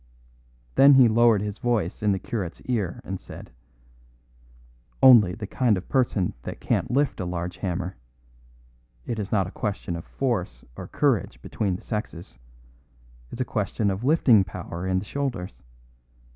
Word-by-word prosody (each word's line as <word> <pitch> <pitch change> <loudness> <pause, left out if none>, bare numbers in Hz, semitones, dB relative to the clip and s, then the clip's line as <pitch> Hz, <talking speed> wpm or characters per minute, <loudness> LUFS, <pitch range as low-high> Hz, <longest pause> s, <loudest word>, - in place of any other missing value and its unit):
Then 140 0 +7
he 130 -2 +7
lowered 115 -2 +4
his 105 0 -5
voice 110 -7 -1
in 105 -1 +2
the 95 - +1
curate's 95 -4 -5
ear 105 -9 -2
and 95 -1 -6
said: - - -11 1.5
"Only 115 -9 +7
the 110 - -6
kind 110 0 +1
of 90 - -7
person 120 -8 +1
that - - -7
can't - - -1
lift 140 +3 0
a 95 - -2
large 90 0 -4
hammer. 90 0 -4 1.1
It 115 - -3
is 100 -1 -4
not 95 -3 +2
a 90 - -8
question 100 -5 -4
of 85 - -6
force 120 -9 -3
or - - -8
courage - - 0
between 100 -4 -2
the - - -9
sexes. 90 - -6 0.9
It's 125 - -5
a - - 0
question 105 -1 -1
of 95 +4 -4
lifting 130 -7 +5
power 90 0 -6
in 95 0 +1
the 95 - -3
shoulders. 100 - -4
105 Hz, 160 wpm, -25 LUFS, 90-120 Hz, 1.5 s, Then